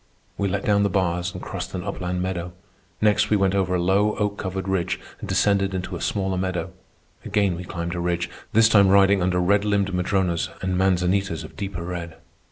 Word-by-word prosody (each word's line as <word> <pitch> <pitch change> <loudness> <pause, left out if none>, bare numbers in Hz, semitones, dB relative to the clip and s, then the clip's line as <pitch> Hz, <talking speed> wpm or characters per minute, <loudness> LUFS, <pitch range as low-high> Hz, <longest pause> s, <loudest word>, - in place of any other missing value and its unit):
We 100 - -1
let 100 +1 -2
down 100 -1 +3
the 100 - +2
bars 90 -2 0
and 90 - -8
crossed 90 0 -5
an 90 - -4
upland 90 -2 -3
meadow. 90 -1 -3 0.5
Next, 105 -1 +3
we 105 - +4
went 95 -1 +2
over 95 -2 +1
a - - +1
low, 100 +4 +2
oak 105 -1 -1
covered 95 0 -4
ridge 95 -3 -1 0.2
and - - -7
descended 100 -2 +2
into 90 0 -4
a 85 - -6
smaller 95 -2 -1
meadow. 95 0 -2 0.5
Again 100 -3 +1
we 90 - -6
climbed 85 0 -4
a 90 - -3
ridge, 85 0 -1 0.2
this 110 0 +6
time 100 -3 +5
riding 100 0 +5
under 90 0 +1
red 100 +3 +3
limbed 100 -2 +1
madronos 90 -1 0
and 95 -1 0
manzanitas 95 -1 +1
of - - -11
deeper 95 -4 -5
red. 85 -2 -5
95 Hz, 200 wpm, -23 LUFS, 90-100 Hz, 0.5 s, this